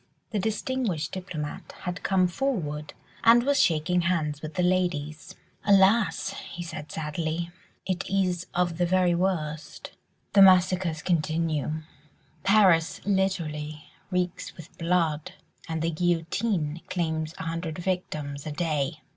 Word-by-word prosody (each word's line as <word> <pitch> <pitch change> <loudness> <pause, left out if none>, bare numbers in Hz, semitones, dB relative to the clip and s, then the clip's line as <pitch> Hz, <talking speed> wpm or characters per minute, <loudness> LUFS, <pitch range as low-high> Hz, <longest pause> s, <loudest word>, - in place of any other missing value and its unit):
The 215 - 0
distinguished 220 -5 -1
diplomatist 175 -6 -6
had 180 0 -4
come 185 -2 +3
forward 175 - -2 0.3
and 235 +1 +7
was 285 +2 +3
shaking 170 +2 +2
hands 155 -4 0
with 155 0 -7
the 180 - +1
ladies. 175 -2 -1 0.3
"Alas!" 200 0 +4 0.2
he 175 - -6
said 155 -3 -7
sadly, 160 +2 -3 0.3
"it 185 0 -2
is 185 -2 0
of 175 -1 0
the 175 - +3
very 180 -1 +3
worst. 165 -4 -2 0.4
The 200 - +7
massacres 185 -3 +5
continue; 155 -2 0 0.6
Paris 190 -5 +4
literally 160 -6 -1 0.2
reeks 180 -2 -2
with 165 -1 -12
blood; 165 -3 0 0.4
and 160 -1 -2
the 165 - +1
guillotine 170 0 0
claims 160 -2 -2
a - - -5
hundred 165 -1 -3
victims 155 -6 -3
a - - -3
day." 150 -1 -1
175 Hz, 125 wpm, -27 LUFS, 155-185 Hz, 0.6 s, and